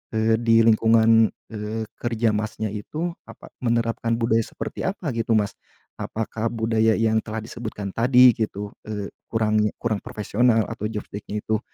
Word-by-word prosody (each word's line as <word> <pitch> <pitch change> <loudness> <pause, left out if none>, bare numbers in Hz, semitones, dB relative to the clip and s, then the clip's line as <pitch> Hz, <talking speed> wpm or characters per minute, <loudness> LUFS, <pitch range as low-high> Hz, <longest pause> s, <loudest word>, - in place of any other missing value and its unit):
eee, 110 0 +3
di 115 -1 +4
lingkungan, 115 0 +5 0.2
eee, 110 +1 -4 0.2
kerja 115 -2 +1
Masnya 105 0 -2
itu 155 +12 -4 0.2
apa - - -13
menerapkan 115 -1 0
budaya 115 -1 +2
seperti - - -5
apa 180 -7 -3
gitu 115 -1 0
Mas? 105 -2 +1 0.5
Apakah 110 +1 -3
budaya 110 -1 +2
yang 110 0 +2
telah 110 0 -5
disebutkan 110 -4 -6
tadi 125 +1 +6
gitu, 105 -2 -3 0.2
eee, 105 -2 -4 0.2
kurang 110 -1 +1 0.2
kurang 110 -3 0
profesional 110 +2 +1
atau 105 - -5
job 105 -2 -4
desk-nya 105 +1 -5
itu 110 -1 0
110 Hz, 150 wpm, -23 LUFS, 110-115 Hz, 0.5 s, tadi